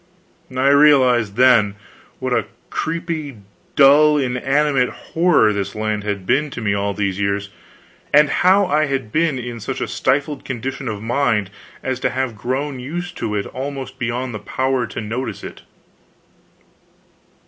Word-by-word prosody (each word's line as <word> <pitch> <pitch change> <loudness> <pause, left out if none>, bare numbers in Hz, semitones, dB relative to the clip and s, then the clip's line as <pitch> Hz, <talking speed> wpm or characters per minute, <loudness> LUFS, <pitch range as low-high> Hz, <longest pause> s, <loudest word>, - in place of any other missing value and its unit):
I 135 +2 +3
realized, 130 -7 +4
then, 120 -5 +4 0.4
what - - -2
a - - 0 0.2
creepy, 160 -5 -3 0.4
dull, 150 +2 +6
inanimate 135 +1 +1
horror 160 -11 +2
this 100 0 -3
land 105 -1 -2
had 100 -2 -3
been 140 +8 +1
to 135 - -7
me 105 -3 0
all 100 0 -1
these 100 -2 -2
years, 100 0 -1 0.6
and 150 +1 +6
how 190 +6 +4
I 155 -2 +2
had 135 -6 -3
been 160 0 +1
in 120 -1 -6
such - - -4
a - - -2
stifled 145 +1 -1
condition 130 +1 -5
of 105 -2 -4
mind 115 -5 0 0.3
as 130 -1 -2
to - - 0
have 130 -3 -2
grown 130 +5 -3
used 175 +7 -5
to 105 - -3
it 100 - -1
almost 135 0 -6
beyond 120 +1 -2
the 105 - -5
power 130 +3 -1
to 110 - -6
notice 110 0 -4
it. - - -9
130 Hz, 150 wpm, -20 LUFS, 110-145 Hz, 0.6 s, dull